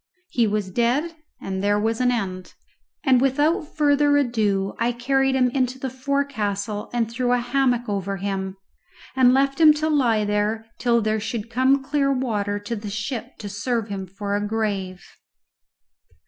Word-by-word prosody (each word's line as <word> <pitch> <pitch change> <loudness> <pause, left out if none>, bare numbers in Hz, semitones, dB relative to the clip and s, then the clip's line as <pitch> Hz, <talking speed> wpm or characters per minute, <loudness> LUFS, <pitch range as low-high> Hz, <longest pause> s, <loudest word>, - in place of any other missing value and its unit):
He 235 -3 +2
was 205 -2 -2
dead, 260 - 0 0.2
and 190 0 -4
there 205 +1 +2
was 225 +3 0
an 250 - +3
end; 185 -6 -4 0.5
and 260 -4 +4
without 290 +4 +2
further 290 -1 +4
ado 210 -7 0
I 240 +1 +1
carried 270 +2 +1
him 250 -2 +3
into 255 -1 0
the 265 -1 -4
forecastle 225 -7 -2
and 235 -2 0
threw 245 +2 0
a - - +4
hammock 245 0 0
over 200 -1 -2
him, 195 -1 -3 0.6
and 255 -1 +5
left 275 +3 +2
him 305 -1 +8
to 310 +1 -1
lie 235 -8 +2
there 210 +2 -1
till 235 -2 +2
there 215 0 0
should 225 +1 -5
come 260 +3 +3
clear 275 0 +1
water 215 -6 -1
to 220 +3 -4
the 210 -1 -6
ship 220 +4 -5
to 210 - -7
serve 225 +2 -2
him 195 -2 -5
for 200 +2 -4
a 205 - 0
grave. 205 -4 -2
235 Hz, 165 wpm, -23 LUFS, 205-265 Hz, 0.6 s, him